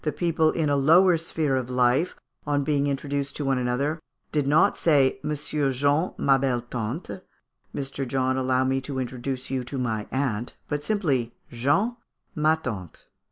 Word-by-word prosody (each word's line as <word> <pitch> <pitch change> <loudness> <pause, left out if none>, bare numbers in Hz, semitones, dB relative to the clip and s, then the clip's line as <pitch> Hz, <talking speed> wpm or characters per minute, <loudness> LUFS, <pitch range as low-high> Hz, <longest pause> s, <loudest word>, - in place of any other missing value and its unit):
People 160 -2 +2
in 160 -3 0
a 145 - +2
lower 165 +6 +5
sphere 160 -3 -1
of 130 -1 -2
life, 125 +7 +2 0.3
on 145 -1 +1
being 145 0 +1
introduced 140 0 -2
to 145 - -3
one 135 -1 +1
another, 135 +6 -1 0.3
did 145 -3 0
not 150 +3 +4
say, 140 -5 +3
"Monsieur 150 -1 -1
Jean, 145 +6 +1
ma 135 -1 +3
belle 130 -3 0
tante" 120 - -5 0.5
"Mr. 135 -1 -3
John, 130 0 0
allow 130 0 +1
me 135 0 0
to 130 +1 -5
introduce 130 +1 -4
you 130 -1 -1
to 135 - -5
my 110 -4 -2
aunt" 125 -4 -2
but 145 -1 -2
simply, 145 - 0 0.2
"Jean, 195 - +1 0.4
ma 155 -2 +3
tante." 105 - -7
135 Hz, 160 wpm, -25 LUFS, 130-150 Hz, 0.5 s, lower